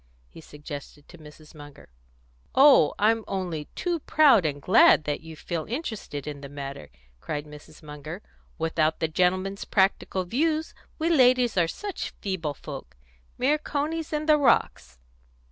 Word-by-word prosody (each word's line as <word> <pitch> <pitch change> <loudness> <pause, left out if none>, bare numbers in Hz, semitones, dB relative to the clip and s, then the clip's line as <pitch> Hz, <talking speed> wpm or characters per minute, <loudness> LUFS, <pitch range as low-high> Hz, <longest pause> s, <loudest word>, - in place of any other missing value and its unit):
he 165 - -14
suggested 145 -1 -10
to 175 - -15
Mrs. 150 0 -15
Munger. 145 -2 -13 0.7
"Oh, 270 - +6
I'm 225 +2 +2
only 175 -6 -3
too 350 -2 -2
proud 275 - +4
and 145 -1 -4
glad 210 - +5
that 145 -1 -3
you 160 0 -10
feel 160 +1 -5
interested 220 - -5
in 145 -2 -7
the 140 - -9
matter!" 140 -1 -8 0.3
cried 150 - -5
Mrs. 150 +1 -14
Munger. 150 +5 -9 0.3
"Without 160 -1 0
the 160 - 0
gentlemen's 185 +4 0
practical 190 -1 +1
views, 310 - -1 0.2
we 320 - -1
ladies 250 -5 +4
are 175 -3 +3
such 405 - -6
feeble 165 -7 -3
folk - - -10 0.4
mere 290 +4 +2
conies 310 +2 -3
in 305 0 -2
the 305 -1 +5
rocks." 270 - +1
180 Hz, 145 wpm, -26 LUFS, -, 0.7 s, Oh